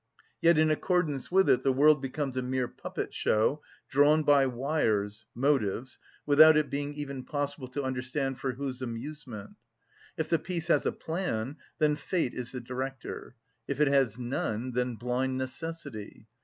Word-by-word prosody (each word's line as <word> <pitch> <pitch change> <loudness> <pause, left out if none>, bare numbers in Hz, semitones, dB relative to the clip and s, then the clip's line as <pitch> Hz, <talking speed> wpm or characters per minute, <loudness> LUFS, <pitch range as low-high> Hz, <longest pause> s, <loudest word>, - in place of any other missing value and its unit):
Yet 170 -1 +5
in 155 0 +4
accordance 155 -4 0
with 190 +1 +4
it - - +4
the 135 - +3
world 145 +2 +5
becomes 135 0 -3
a 130 - 0
mere 125 0 -1
puppet‐show, 110 +6 -1 0.3
drawn 145 +3 +4
by 145 -2 +5
wires 110 -6 -1
(motives), 130 -3 0 0.3
without 155 +2 +8
it 155 -1 +1
being 145 +1 -3
even 140 -3 -5
possible 145 -2 -3
to 140 +3 -4
understand 130 +1 -2
for 130 -2 -2
whose 130 0 -5
amusement. 120 -3 -7 0.6
If 160 - -1
the 165 0 +2
piece 170 0 -4
has - - +3
a - - +2
plan, 150 -6 -3 0.2
then 150 -1 +3
fate 155 -2 -1
is 125 -1 -5
the 125 - -5
director; 130 +1 -6 0.3
if 140 - -3
it 150 -2 +4
has 135 -6 +2
none, 125 -1 -2
then 125 0 -1
blind 125 +3 -1
necessity. 130 -6 -6
135 Hz, 155 wpm, -29 LUFS, 125-150 Hz, 0.6 s, without